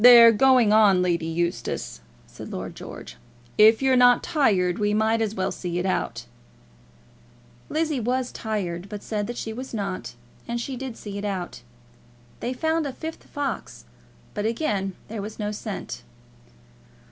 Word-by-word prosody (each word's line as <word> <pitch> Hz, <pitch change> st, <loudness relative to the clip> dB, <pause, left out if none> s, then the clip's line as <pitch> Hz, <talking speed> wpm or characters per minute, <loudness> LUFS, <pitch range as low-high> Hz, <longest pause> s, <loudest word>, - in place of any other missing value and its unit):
"They're 235 Hz, -2 st, +10 dB
going 245 Hz, -1 st, +5 dB
on, 200 Hz, -4 st, +6 dB
Lady 170 Hz, -2 st, 0 dB
Eustace," 165 Hz, -, -2 dB, 0.2 s
said -, -, -10 dB
Lord -, -, -5 dB
George. -, -, -9 dB, 0.4 s
"If 220 Hz, +4 st, +7 dB
you're 265 Hz, -1 st, +4 dB
not 245 Hz, -1 st, +6 dB
tired, 195 Hz, -, +2 dB
we 210 Hz, 0 st, +1 dB
might 220 Hz, +1 st, +2 dB
as 220 Hz, -1 st, -1 dB
well 190 Hz, -, -1 dB
see 175 Hz, -1 st, -4 dB
it 175 Hz, -, -1 dB
out." 120 Hz, -10 st, -1 dB, 1.4 s
Lizzie 310 Hz, -2 st, 0 dB
was 250 Hz, +2 st, -1 dB
tired, 195 Hz, -4 st, -3 dB
but 205 Hz, -1 st, -7 dB
said 210 Hz, -2 st, -2 dB
that 240 Hz, -, -5 dB
she 220 Hz, -, -4 dB
was 255 Hz, +1 st, -6 dB
not, 195 Hz, -, -4 dB, 0.3 s
and 235 Hz, 0 st, -2 dB
she 260 Hz, +3 st, -4 dB
did 255 Hz, -2 st, -6 dB
see 200 Hz, -1 st, -6 dB
it -, -, -6 dB
out. 190 Hz, -3 st, -4 dB, 0.8 s
They 245 Hz, -, -2 dB
found 320 Hz, +3 st, 0 dB
a -, -, -3 dB
fifth 320 Hz, +4 st, -7 dB
fox, 290 Hz, -1 st, -4 dB, 0.5 s
but 210 Hz, 0 st, -1 dB
again 210 Hz, -6 st, -1 dB
there 215 Hz, -1 st, -5 dB
was 210 Hz, +2 st, -7 dB
no 210 Hz, -1 st, -2 dB
scent. 205 Hz, -, -6 dB
215 Hz, 160 wpm, -25 LUFS, 190-245 Hz, 1.4 s, They're